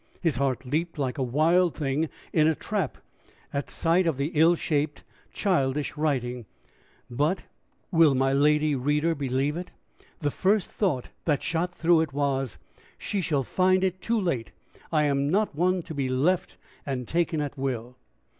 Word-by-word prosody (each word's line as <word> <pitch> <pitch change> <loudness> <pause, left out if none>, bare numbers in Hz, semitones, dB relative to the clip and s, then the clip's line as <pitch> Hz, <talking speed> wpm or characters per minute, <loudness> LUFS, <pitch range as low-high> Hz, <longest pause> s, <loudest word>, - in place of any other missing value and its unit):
His 165 -8 0
heart 135 -1 0
leaped 160 +6 -2
like 135 -2 -2
a - - 0
wild 160 +7 +3
thing 150 +1 -1 0.2
in 155 -2 +4
a 160 - +3
trap - - -2 0.6
at 140 0 -2
sight 170 +2 +2
of 160 -5 0
the 140 +4 -1
ill 165 +2 +5
shaped, 150 -3 -1 0.3
childish 150 -8 0
writing; 125 -6 -1 0.6
but 150 +9 0 0.5
will 165 -5 +5
my 135 +1 +2
lady 150 +2 +3
reader 150 +5 +1
believe 140 0 -1
it? 175 +1 -5 0.5
the 145 -2 -1
first 195 +4 +1
thought 160 - -1 0.2
that 150 -4 +1
shot 175 +2 -1
through 165 -1 +4
it 155 -4 -3
was 135 -3 -1 0.4
"She 200 - -2
shall 150 -5 0
find 185 +6 +2
it 185 -1 -1
too 230 0 0
late! 155 - -1 0.4
I 155 -2 +3
am 140 -1 +1
not 205 +4 +1
one 180 +3 +1
to 160 - -8
be 135 -3 -1
left 150 +8 0 0.3
and 130 -4 -4
taken 165 -2 0
at 145 -1 -3
will!" 125 -3 -3
150 Hz, 165 wpm, -26 LUFS, 135-170 Hz, 0.6 s, ill